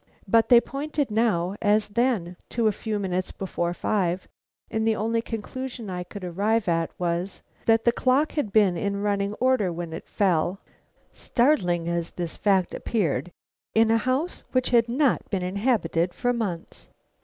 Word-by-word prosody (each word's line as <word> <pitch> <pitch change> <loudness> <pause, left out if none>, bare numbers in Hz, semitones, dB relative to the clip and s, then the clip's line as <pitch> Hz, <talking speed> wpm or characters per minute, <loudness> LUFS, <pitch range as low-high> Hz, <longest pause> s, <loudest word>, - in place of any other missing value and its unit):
But 225 +2 +4
they 240 - +9
pointed 285 0 -3
now 205 -5 +1
as 210 0 +2
then 210 -6 0
to 230 -1 -1
a 215 - +5
few 215 +1 -3
minutes 185 -2 -2
before 175 -2 -3
five 180 -1 -1 0.4
and 220 0 0
the 220 - +3
only 230 +2 0
conclusion 235 0 -6
I 180 -1 -3
could 185 +2 -10
arrive 200 +5 0
at 165 -1 +1
was, 175 +2 -2 0.2
that 225 0 +4
the 235 - +6
clock 260 +5 +2
had 285 -10 -2
been 200 -4 +4
in 200 +3 -2
running 200 0 0
order 250 -7 +2
when 170 -1 -5
it 165 - -7
fell, 185 -1 +1 0.5
startling 185 - +1
as 170 -1 -1
this 170 -2 -5
fact 190 -4 +2
appeared 175 - -1 0.4
in 225 0 +5
a 225 - +5
house 260 - -1
which 255 -1 +1
had 235 -1 +4
not 265 +2 +1
been 190 -3 -1
inhabited 185 -4 0
for 245 0 0
months. 200 -8 -4
205 Hz, 165 wpm, -25 LUFS, 180-235 Hz, 0.5 s, they